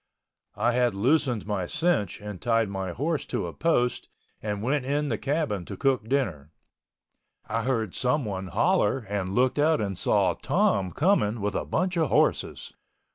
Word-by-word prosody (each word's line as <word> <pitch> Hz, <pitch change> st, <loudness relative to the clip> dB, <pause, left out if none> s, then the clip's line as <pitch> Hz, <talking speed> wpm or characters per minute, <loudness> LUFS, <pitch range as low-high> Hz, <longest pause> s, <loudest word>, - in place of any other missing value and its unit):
I 120 Hz, -, +2 dB
had 120 Hz, -3 st, +1 dB
loosened 125 Hz, +1 st, +1 dB
my 100 Hz, -4 st, -2 dB
cinch 135 Hz, -, 0 dB
and 105 Hz, -3 st, -7 dB
tied 115 Hz, -3 st, +2 dB
my 95 Hz, -2 st, -3 dB
horse 150 Hz, -, -1 dB
to -, -, -2 dB
a -, -, -6 dB
post 125 Hz, -7 st, 0 dB, 0.3 s
and 105 Hz, -1 st, -3 dB
went 135 Hz, +3 st, +1 dB
in 145 Hz, +2 st, -1 dB
the 110 Hz, -, 0 dB
cabin 140 Hz, -, -1 dB
to -, -, -7 dB
cook 130 Hz, -5 st, 0 dB
dinner. 95 Hz, -, -1 dB, 1.0 s
I 115 Hz, +2 st, -1 dB
heard 115 Hz, -5 st, -1 dB
someone 110 Hz, -8 st, -1 dB
holler 130 Hz, -, +1 dB
and 100 Hz, -1 st, -2 dB
looked 130 Hz, +3 st, +2 dB
out 155 Hz, +2 st, +3 dB
and 100 Hz, -3 st, -2 dB
saw -, -, +2 dB
Tom 95 Hz, -2 st, +1 dB
coming 120 Hz, -, +2 dB
with 105 Hz, 0 st, -1 dB
a -, -, -2 dB
bunch 180 Hz, 0 st, -1 dB
of 160 Hz, -5 st, +2 dB
horses. -, -, 0 dB
120 Hz, 165 wpm, -26 LUFS, 100-145 Hz, 1.0 s, out